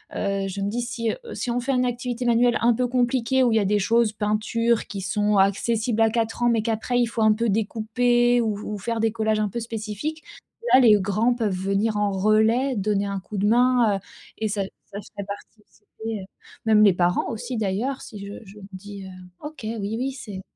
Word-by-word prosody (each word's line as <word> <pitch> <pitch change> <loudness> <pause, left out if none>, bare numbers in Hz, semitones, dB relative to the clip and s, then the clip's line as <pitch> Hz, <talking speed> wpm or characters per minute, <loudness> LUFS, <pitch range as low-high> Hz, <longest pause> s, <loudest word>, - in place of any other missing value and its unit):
heu, 195 -1 -1
je 200 +1 -6
me 200 - -1
dis 240 +3 -2
si, 235 -1 -2
heu: - - -6 0.2
«Si 245 - -4
on 245 - -1
fait 270 +3 -1
un 255 -1 +2
activité 245 0 -3
manuelle 240 0 +3
un 235 0 +4
peu 250 +2 0
compliquée 250 +1 +1
où 240 - +3
il - - +2
y 220 - +5
a 200 - 0
des 205 +1 +2
choses, 230 +2 +2
peinture, 215 +2 0
qui 195 -2 -6
sont 205 +2 +1
accessibles 220 +4 +1
à 225 - +5
4 225 +1 -1
ans, 240 - +4
mais 230 -2 +2
qu'après 230 +2 0
il 240 - +4
faut 230 0 -3
un 215 - +5
peu 230 +2 -1
découper 240 +3 +2
ou 215 -3 -1 0.2
ou - - -5
faire 230 +3 -3
des 225 0 +2
collages 220 -1 0
un 210 -1 0
peu 235 - -4
spécifiques. 225 +7 -5 0.5
Là, 260 - +9
les 230 -4 +7
grands 215 +5 +1
peuvent 220 -4 -1
venir 195 +3 0
en 205 -1 +1
relais 220 +6 +2
donner 205 0 0
un 200 -1 -3
coup 200 +2 -8
de 205 +2 +1
main», 240 -2 +4
heu, - - -8 0.4
et 220 - -1
ça 200 -1 -1 0.2
ça 200 -1 -8
ferait 200 -1 -8
participer, 205 +1 -11 0.4
heu, 185 - -9 0.4
même 215 -1 +5
les 200 -3 +6
parents 180 +5 +1
aussi, 230 +3 -5
d'ailleurs, 220 +7 -1
si 210 -4 -9
je 200 - -7
je 200 +2 -14
me 195 - -11
dis, 200 +1 -9
heu 190 - -9 0.3
OK, 300 +1 -9
oui, 215 -1 -3
oui, 265 +2 -1
c'est 210 -8 -8
220 Hz, 225 wpm, -24 LUFS, 205-240 Hz, 0.5 s, Là